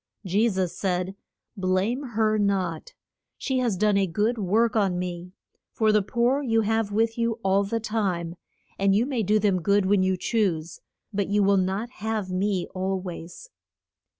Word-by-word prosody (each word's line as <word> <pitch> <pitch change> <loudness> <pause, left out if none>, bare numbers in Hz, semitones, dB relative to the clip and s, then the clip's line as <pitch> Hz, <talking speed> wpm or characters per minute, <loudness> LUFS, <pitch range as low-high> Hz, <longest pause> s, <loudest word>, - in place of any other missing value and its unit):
Je 205 +6 +2
sus 185 -4 -2
said, 185 0 -2 0.4
Blame 190 +6 0
her 220 -4 0
not. 200 - -1 0.4
She 265 -2 -1
has 235 -6 0
done 210 +1 +3
a 195 -1 +2
good 215 +7 0
work 215 +4 +2
on 195 -4 +2
me. 180 0 -5 0.4
For 220 -1 +2
the 210 0 +4
poor 240 +7 +1
you 225 -5 +2
have 220 -1 0
with 225 +2 0
you 230 0 +1
all 195 +1 +3
the 230 +3 -2
time, 190 -7 -2 0.4
and 195 0 +3
you 225 +4 +3
may 260 -4 -1
do 210 +1 +2
them 200 -4 +1
good 200 +3 +2
when 195 0 +3
you 185 0 +1
choose. 180 -6 -1 0.3
But 200 -1 0
you 205 +1 +2
will 200 0 +4
not 195 +6 -1
have 215 -3 -3
me 190 0 0
al 190 +1 -1
ways. 180 - -8
200 Hz, 175 wpm, -25 LUFS, 185-225 Hz, 0.4 s, the